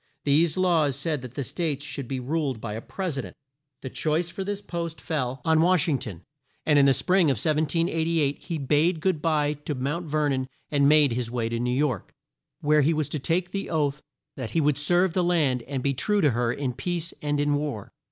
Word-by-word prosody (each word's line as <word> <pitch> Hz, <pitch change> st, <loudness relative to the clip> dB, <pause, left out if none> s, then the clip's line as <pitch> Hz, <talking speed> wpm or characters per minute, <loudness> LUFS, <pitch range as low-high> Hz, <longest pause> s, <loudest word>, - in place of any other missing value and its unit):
These 150 Hz, +3 st, +3 dB
laws 165 Hz, -7 st, +2 dB
said 145 Hz, +1 st, -2 dB
that 125 Hz, -1 st, -9 dB
the 140 Hz, -, -2 dB
States 150 Hz, -1 st, -3 dB
should 140 Hz, -3 st, -5 dB
be 130 Hz, 0 st, -3 dB
ruled 135 Hz, -1 st, -2 dB
by 105 Hz, -1 st, -5 dB
a 110 Hz, -, -5 dB
Pres 180 Hz, -4 st, -4 dB
i -, -, 0 dB
dent. -, -, -10 dB, 0.5 s
The 130 Hz, -, -4 dB
choice 160 Hz, +2 st, 0 dB
for 195 Hz, -, -4 dB
this 200 Hz, +1 st, -3 dB
post 170 Hz, -4 st, -5 dB
fell 130 Hz, -5 st, -2 dB
on 160 Hz, -1 st, +4 dB
Wash 175 Hz, -2 st, +3 dB
ing 140 Hz, -5 st, +1 dB
ton, 90 Hz, -7 st, -8 dB, 0.4 s
and 150 Hz, -2 st, +5 dB
in 140 Hz, -, +6 dB
the 135 Hz, -, +6 dB
spring 180 Hz, +8 st, +3 dB
of 135 Hz, -, +2 dB
1788 160 Hz, -, +1 dB
he 170 Hz, -3 st, -4 dB
bade 150 Hz, +4 st, +2 dB
good 170 Hz, -2 st, 0 dB
bye 150 Hz, -2 st, +1 dB
to 150 Hz, 0 st, -5 dB
Mount 145 Hz, +7 st, -3 dB
Ver 150 Hz, 0 st, +1 dB
non 130 Hz, -1 st, -1 dB, 0.2 s
and 140 Hz, -1 st, +4 dB
made 150 Hz, -3 st, +6 dB
his 120 Hz, 0 st, -2 dB
way 115 Hz, -1 st, -2 dB
to 115 Hz, 0 st, -2 dB
New 120 Hz, +1 st, -1 dB
York, 135 Hz, -8 st, -1 dB, 0.5 s
where 150 Hz, 0 st, +4 dB
he 155 Hz, +3 st, +2 dB
was 155 Hz, -2 st, -1 dB
to 150 Hz, -, -2 dB
take 175 Hz, +5 st, -1 dB
the 195 Hz, -, -3 dB
oath 150 Hz, -2 st, 0 dB, 0.3 s
that 130 Hz, -4 st, -5 dB
he 165 Hz, -, 0 dB
would 145 Hz, -2 st, +2 dB
serve 175 Hz, +4 st, +2 dB
the 180 Hz, -, +1 dB
land 155 Hz, -8 st, +2 dB
and 135 Hz, -2 st, -3 dB
be 140 Hz, -, +1 dB
true 205 Hz, -, +1 dB
to 150 Hz, -5 st, +4 dB
her 120 Hz, 0 st, 0 dB
in 130 Hz, 0 st, -2 dB
peace 170 Hz, +4 st, -3 dB
and 145 Hz, -1 st, 0 dB
in 145 Hz, 0 st, +2 dB
war. 145 Hz, -8 st, -3 dB
150 Hz, 225 wpm, -26 LUFS, 135-165 Hz, 0.5 s, in